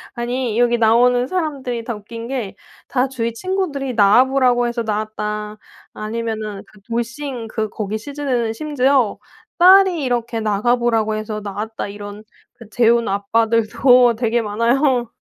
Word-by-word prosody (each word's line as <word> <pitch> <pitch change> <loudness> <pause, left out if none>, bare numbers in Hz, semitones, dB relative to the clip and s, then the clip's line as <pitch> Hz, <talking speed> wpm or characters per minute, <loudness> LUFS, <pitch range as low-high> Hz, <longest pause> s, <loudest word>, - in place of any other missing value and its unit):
아니 240 -1 -2
여기 240 0 +3
나오는 245 +2 +3
사람들이 275 -9 -3
다 235 -1 -4
웃긴 230 +3 -9
게 235 -7 -4 0.3
다 255 0 0
"주위 235 -3 -3
친구들이 285 -4 -3
나와 210 +4 +6
보라고 250 -2 +2
해서 235 0 -3
나왔다." 210 0 -4 0.4
아니면은 215 -2 -5
그 210 - -20
돌싱 235 +2 -4
그 215 0 -3
거기 210 +1 -4
시즌에는 250 -2 -2
심지어 270 -3 +1 0.4
"딸이 370 -2 +6
이렇게 240 -2 -1
나가 215 +2 +1
보라고 225 -3 0
해서 215 0 -5
나왔다." 210 +2 -5
이런 205 +1 -9 0.3
그 230 -3 -15
재혼 235 0 +2
아빠들도 230 +4 +3
되게 235 0 0
많아요. 240 +3 +1
235 Hz, 305 characters per minute, -19 LUFS, 215-255 Hz, 0.4 s, 나와